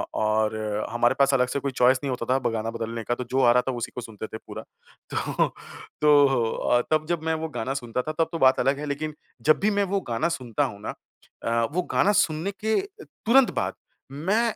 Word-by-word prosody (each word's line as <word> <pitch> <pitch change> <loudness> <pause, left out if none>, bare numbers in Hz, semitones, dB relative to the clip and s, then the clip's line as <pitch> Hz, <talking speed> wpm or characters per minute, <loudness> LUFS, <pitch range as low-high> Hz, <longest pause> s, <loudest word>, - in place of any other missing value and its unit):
अ, - - -1
और 110 0 +1 0.3
हमारे 120 +2 +2
पास 140 0 +4
अलग 125 -1 +3
से 140 - -1
कोई 140 0 -3
चॉइस 125 +1 +4
नहीं 140 - -1
होता 120 -2 -3
था - - +3
ब - - -3
गाना 110 0 -2
बदलने 115 0 -4
का 120 - 0
तो 125 - -5
जो 135 +1 +1
आ 120 - +6
रहा 125 +1 +4
था 130 - +1
उसी 120 - -4
को - - -4
सुनते 110 -2 -7
थे 110 - -8
पूरा। - - -7 0.5
तो, - - 0 0.5
तो 145 -1 +6 0.3
अ, 120 - +2
तब 155 0 +2
जब 170 -2 -1
मैं 160 - +1
वो 160 0 -3
गाना 130 +4 -2
सुनता 125 -1 -3
था 155 - -4
तब 165 - +2
तो 165 - -2
बात 130 -3 +5
अलग 140 +1 +2
है 150 - -5
लेक़िन 150 +2 -3 0.3
जब 155 - +4
भी 210 - +2
मैं 200 - +3
वो 195 - +2
गाना 115 +9 +1
सुनता 130 -4 -1
हूँ 100 -7 -6
ना, - - -4 0.5
अ, 115 0 +1
वो 180 - 0
गाना 205 - +4
सुनने 160 +4 -3
के 220 0 +2 0.2
तुरंत 255 +3 +3
बाद - - -1 0.4
मैं 190 +11 +1
135 Hz, 235 wpm, -25 LUFS, 115-155 Hz, 0.5 s, आ